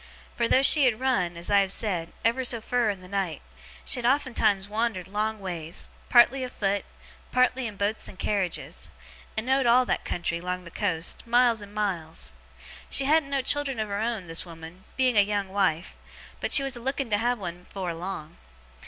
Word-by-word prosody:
Fur, 235 - +1
though 265 - +4
she 285 0 +7
had 240 -3 +2
run 185 -10 0
(as 170 +4 -3
I 200 - +6
have 195 -1 +1
said) 180 -6 -1
ever 235 +3 +2
so 240 -2 +1
fur 240 0 +1
in 195 -3 -3
the 180 - -12
night, 185 -5 -2 0.4
she - - +1
had - - -5
oftentimes 230 -7 +2
wandered 215 -4 -1
long 215 +2 -2
ways, 175 -4 -5 0.2
partly 255 +2 +6
afoot, 205 -5 -1 0.5
partly 255 0 +2
in 210 -3 -8
boats 205 +2 -1
and 185 - -11
carriages, 195 -4 -2 0.5
and 220 - -1
know'd 265 0 +2
all 250 +2 +5
that - - -1
country, 170 -1 -2
'long 180 0 -3
the 170 - -11
coast, 180 0 -2
miles 240 -2 +4
and 205 +1 -11
miles. 175 -6 -3 0.6
She 270 - 0
hadn't 305 0 +3
no 275 -2 0
children 280 -3 0
of 215 -1 -2
her 200 0 -2
own, 225 -4 -2
this 165 -1 -2
woman, 165 +1 -11
being 255 -4 +4
a - - +9
young 200 -1 -1
wife; 190 -4 0 0.4
but - - -2
she 275 - +6
was 270 -2 -1
a - - -7
looking 265 -1 -2
to 205 - +3
have 240 +2 +1
one 180 -3 -7
afore 185 -3 -3
long. 165 -2 -6
210 Hz, 195 wpm, -27 LUFS, 185-245 Hz, 0.6 s, a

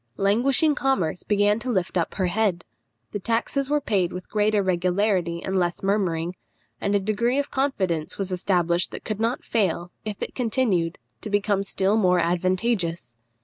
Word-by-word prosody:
Languishing 255 +10 +3
commerce 265 - 0
began 205 +1 +2
to 255 - -4
lift 190 -7 -1
up 170 -2 0
her 190 - 0
head; 180 -2 0 0.5
the 205 - -3
taxes 235 +6 -1
were 295 0 +3
paid 195 -10 0
with 180 0 -8
greater 210 -1 +2
regularity 180 -1 +1
and 190 - -2
less 175 0 -1
murmuring; 180 -4 0 0.5
and 200 0 +1
a - - +4
degree 215 +6 0
of 285 0 -1
confidence 190 - -1
was 195 -1 -3
established 175 -2 +1
that - - -9
could 215 -1 -3
not 230 +3 0
fail, 180 -5 0
if 210 -2 -5
it - - -4
continued, 220 -9 0 0.2
to 215 - -6
become 205 -1 +1
still 195 +1 +1
more 180 -4 +4
advantageous. 175 - 0
195 Hz, 165 wpm, -24 LUFS, 180-220 Hz, 0.5 s, a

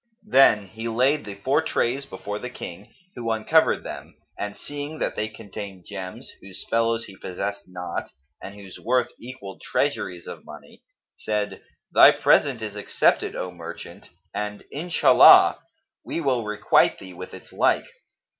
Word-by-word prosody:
Then 135 - +5
he 110 +4 -7
laid 130 +4 +2
the 100 -1 -7
four 130 +10 +1
trays 135 -3 -1
before 100 +2 -6
the 125 - -6
King, 100 -5 -9 0.2
who 120 -2 -4
uncovered 115 +9 +3
them - - -8 0.2
and 105 0 -5
seeing 145 +2 -7
that - - -2
they 110 - -1
contained 100 -4 -9
gems, 95 -2 -7
whose 95 -1 -10
fellows 115 0 +1
he 100 - -12
possessed 100 +2 -5
not 90 -1 -5 0.3
and 100 - -9
whose 100 -2 -11
worth 125 +1 +1
equalled 120 -6 -10
treasuries 90 -2 -2
of - - -9
money, - - -13 0.4
said, 105 -1 -2 0.3
"Thy - - +9
present 130 -6 +3
is 105 -1 -5
accepted, 105 - +1
O 90 - -4
merchant, 85 -2 -10 0.2
and 105 0 -4
Inshallah! 165 +4 +6 0.4
we - - -4
will 130 -7 0
requite 105 0 +3
thee 95 -1 -11
with 90 +1 -9
its - - -14
like." - - +2
105 Hz, 150 wpm, -24 LUFS, 100-125 Hz, 0.4 s, Thy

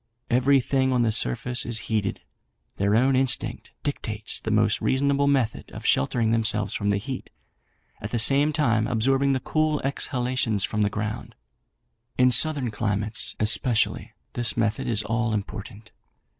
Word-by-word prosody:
Everything 130 +1 +2
on 125 -2 +2
the 115 - +1
surface 110 - +1
is 115 -1 0
heated; 105 -3 -2 0.6
their 100 +2 +1
own 130 +3 +3
instinct 130 -2 0
dictates 110 -7 -1
the - - -5
most 105 -1 +1
reasonable 140 +1 +1
method 130 -6 -1
of - - -9
sheltering 110 - +1
themselves 110 -2 0
from 100 -1 -2
the 100 - +1
heat, 130 +6 -6 0.7
at 105 - -5
the 120 - -2
same 140 +5 +3
time 115 -8 +1
absorbing 135 +3 +1
the 130 - 0
cool 155 +1 0
exhalations 125 -5 -1
from 105 - -2
the 100 - +2
ground. 110 +2 -5 0.8
In 125 0 +4
southern 140 -2 +3
climates, 105 0 -1
especially, 110 +2 +1 0.2
this 120 -1 0
method 110 -2 -1
is 110 -3 +2
all 115 -1 -1
important. 105 +1 -7
115 Hz, 145 wpm, -24 LUFS, 105-130 Hz, 0.8 s, In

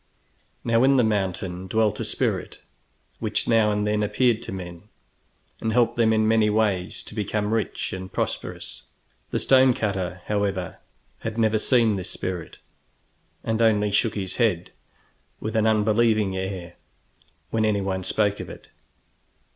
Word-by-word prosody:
Now 115 +1 +3
in 135 +1 +5
the 125 - +5
mountain 95 -3 -1
dwelt 110 +1 +1
a - - -1
spirit - - -2 0.6
which - - -1
now 110 -2 +4
and 105 0 0
then 105 0 +1
appeared 115 +2 +2
to - - -7
men, 90 +1 -8 0.7
and 110 - -1
helped 120 -1 +3
them 115 -1 +3
in 110 0 +3
many 110 -1 +4
ways 105 -4 0
to - - -9
become 105 0 -1
rich 115 -2 -2
and 95 0 -6
prosperous. - - -4 0.5
The - - -1
stone 130 -2 +5
cutter, 95 -3 -2
however, 100 -3 -2 0.4
had 110 0 -5
never 110 -1 +2
seen 115 -4 +3
this 95 0 -5
spirit, 90 -3 -4 0.9
and 110 0 -1
only 105 -2 +3
shook 105 +2 +1
his 95 -3 -4
head, 100 -8 +1 0.7
with 110 +1 -4
an 110 0 +3
unbelieving 110 -2 +2
air, 95 -2 -5 0.7
when 110 -1 +1
anyone 100 -3 0
spoke 105 +2 +1
of - - -6
it. - - -12
105 Hz, 145 wpm, -24 LUFS, 95-110 Hz, 0.9 s, in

